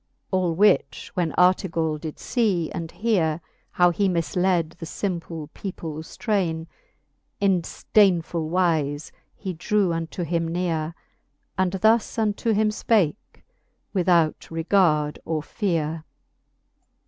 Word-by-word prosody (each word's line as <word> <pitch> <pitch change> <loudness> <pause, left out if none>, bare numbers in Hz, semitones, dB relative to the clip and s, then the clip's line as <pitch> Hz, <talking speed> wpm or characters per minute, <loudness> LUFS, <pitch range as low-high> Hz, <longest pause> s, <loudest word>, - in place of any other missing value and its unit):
All 180 -3 +1
which 150 - +2
when 175 -4 0
Artegall 170 -4 +2
did 155 -1 -7 0.2
lee 200 -9 +2
and 165 -1 -5
heare^ 175 -9 +1 0.3
How 175 -2 +4
he 195 +3 +1
mii^led 175 -1 0
the 165 - -7
fimple 170 -5 -4
peoples 160 -5 -7
train©, 180 -8 0 0.7
In 195 -3 +3
fdeignfull 170 -4 +1
wize 155 -5 0 0.2
he 190 -3 -5
drew 185 +2 +1
unto 165 +2 -3
him 165 0 -1
neare, 165 -2 -2 0.6
And 185 0 +1
thus 220 +5 +2
unto 220 +1 0
him 215 0 +2 0.2
(pake, 205 -6 +1 0.5
without 175 -4 +2
regard 165 -3 +2
or 155 -2 -2
feare: 165 -5 -2
XXXIV. - - -47
175 Hz, 115 wpm, -24 LUFS, 160-195 Hz, 0.7 s, How